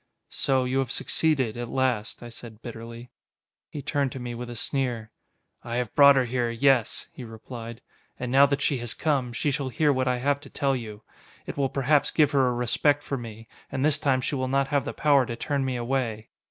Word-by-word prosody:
"So 130 Hz, -1 st, +1 dB
you 130 Hz, +1 st, 0 dB
have 135 Hz, -3 st, -1 dB
succeeded 135 Hz, -9 st, +1 dB
at 120 Hz, -1 st, -4 dB
last," 125 Hz, -4 st, -1 dB
I 120 Hz, -, -8 dB
said 115 Hz, -1 st, -11 dB
bitterly. 115 Hz, +1 st, -9 dB, 0.6 s
He 145 Hz, -, -7 dB
turned 140 Hz, -1 st, 0 dB
to 130 Hz, -, -6 dB
me 120 Hz, -1 st, -5 dB
with 120 Hz, +1 st, -6 dB
a 120 Hz, -, -7 dB
sneer. 120 Hz, -3 st, -2 dB, 0.5 s
"I 115 Hz, -, -4 dB
have 125 Hz, -2 st, -2 dB
brought 140 Hz, -1 st, +8 dB
her 130 Hz, -1 st, +3 dB
here, 120 Hz, 0 st, -1 dB
yes," 120 Hz, 0 st, +2 dB
he 130 Hz, -, -9 dB
replied. 115 Hz, +1 st, -9 dB, 0.4 s
"And 125 Hz, -1 st, -3 dB
now 140 Hz, +2 st, +7 dB
that 140 Hz, 0 st, -1 dB
she 140 Hz, -, +1 dB
has 120 Hz, -1 st, -4 dB
come, 140 Hz, -6 st, 0 dB
she 130 Hz, +6 st, -1 dB
shall 135 Hz, -1 st, -2 dB
hear 150 Hz, +2 st, +2 dB
what 130 Hz, -1 st, 0 dB
I 125 Hz, 0 st, +2 dB
have 140 Hz, +3 st, +1 dB
to -, -, -13 dB
tell 135 Hz, -1 st, 0 dB
you. 110 Hz, -4 st, -7 dB, 0.4 s
It -, -, -6 dB
will 140 Hz, -2 st, 0 dB
perhaps 140 Hz, +2 st, +2 dB
give 150 Hz, -3 st, +3 dB
her 135 Hz, -2 st, +3 dB
a -, -, +2 dB
respect 125 Hz, +5 st, +1 dB
for 140 Hz, -, -3 dB
me, 115 Hz, -3 st, -8 dB, 0.2 s
and 130 Hz, 0 st, 0 dB
this 155 Hz, 0 st, +2 dB
time 135 Hz, -4 st, +2 dB
she -, -, -2 dB
will 130 Hz, -2 st, -1 dB
not 135 Hz, +1 st, +1 dB
have 140 Hz, -2 st, +1 dB
the 145 Hz, -, -4 dB
power 145 Hz, -3 st, +4 dB
to 120 Hz, -, -4 dB
turn 140 Hz, +2 st, -1 dB
me 130 Hz, -1 st, -1 dB
away." 120 Hz, -3 st, -2 dB
130 Hz, 220 wpm, -26 LUFS, 120-140 Hz, 0.6 s, brought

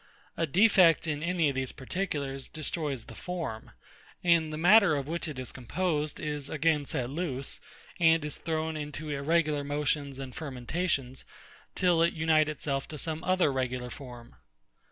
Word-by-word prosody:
A 165 Hz, -, 0 dB
defect 180 Hz, -1 st, +5 dB
in 150 Hz, -2 st, -2 dB
any 170 Hz, -2 st, +2 dB
of -, -, -2 dB
these 130 Hz, -1 st, -2 dB
particulars 140 Hz, -3 st, -3 dB
destroys 150 Hz, -5 st, -3 dB
the -, -, -10 dB
form; 165 Hz, -12 st, -5 dB, 0.5 s
and 170 Hz, -3 st, +4 dB
the 155 Hz, -, -4 dB
matter 185 Hz, 0 st, +6 dB
of 140 Hz, -1 st, -3 dB
which 170 Hz, +2 st, -2 dB
it 150 Hz, -4 st, -6 dB
is 130 Hz, -1 st, -5 dB
composed 150 Hz, +3 st, -2 dB
is 150 Hz, -2 st, -3 dB
again 155 Hz, -1 st, +1 dB
set 130 Hz, -5 st, -1 dB
loose, 140 Hz, -4 st, -3 dB, 0.4 s
and 165 Hz, -2 st, +4 dB
is 150 Hz, -, -4 dB
thrown 160 Hz, -1 st, -2 dB
into 150 Hz, 0 st, -5 dB
irregular 150 Hz, +1 st, +1 dB
motions 145 Hz, -1 st, -1 dB
and 135 Hz, -2 st, -7 dB
fermentations, 135 Hz, -1 st, -2 dB, 0.5 s
till 175 Hz, -2 st, +3 dB
it 170 Hz, +1 st, +3 dB
unite 155 Hz, -1 st, +3 dB
itself 140 Hz, -2 st, -2 dB
to 155 Hz, -, -7 dB
some 160 Hz, +2 st, -3 dB
other 185 Hz, -6 st, +2 dB
regular 125 Hz, -1 st, -2 dB
form. 120 Hz, -3 st, -10 dB
150 Hz, 155 wpm, -29 LUFS, 135-165 Hz, 0.5 s, matter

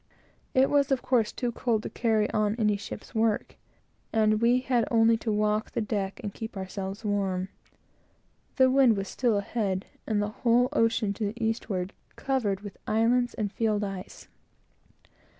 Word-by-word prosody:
It 265 Hz, +1 st, +4 dB
was, 285 Hz, -1 st, +3 dB
of 265 Hz, -, +1 dB
course, 235 Hz, -4 st, +2 dB
too 245 Hz, -2 st, -2 dB
cold 225 Hz, -2 st, -1 dB
to -, -, -4 dB
carry 220 Hz, -3 st, +1 dB
on 210 Hz, 0 st, +1 dB
any 210 Hz, -3 st, +2 dB
ship's 200 Hz, -, -8 dB
work, 220 Hz, -1 st, 0 dB, 0.6 s
and 215 Hz, -1 st, +2 dB
we 245 Hz, +2 st, +4 dB
had 245 Hz, -3 st, +1 dB
only 230 Hz, -1 st, +4 dB
to 225 Hz, 0 st, -2 dB
walk 210 Hz, +1 st, +1 dB
the -, -, -3 dB
deck 205 Hz, -2 st, -2 dB
and 205 Hz, -2 st, -4 dB
keep 225 Hz, -2 st, -7 dB
ourselves 195 Hz, +2 st, -5 dB
warm. 195 Hz, -2 st, -1 dB, 1.1 s
The 260 Hz, -1 st, +5 dB
wind 260 Hz, -5 st, +5 dB
was 195 Hz, 0 st, -3 dB
still 235 Hz, -1 st, +1 dB
ahead, 200 Hz, -2 st, -2 dB, 0.2 s
and 215 Hz, -2 st, +1 dB
the 205 Hz, 0 st, 0 dB
whole 245 Hz, +1 st, +4 dB
ocean, 225 Hz, -5 st, +2 dB
to 215 Hz, +1 st, -3 dB
the 215 Hz, +4 st, -4 dB
eastward, 200 Hz, -4 st, -2 dB, 0.2 s
covered 220 Hz, -8 st, -1 dB
with 205 Hz, -2 st, -9 dB
islands 240 Hz, +3 st, +2 dB
and 210 Hz, -3 st, -2 dB
field 215 Hz, -2 st, 0 dB
ice. 195 Hz, -1 st, -7 dB
220 Hz, 165 wpm, -27 LUFS, 205-235 Hz, 1.1 s, The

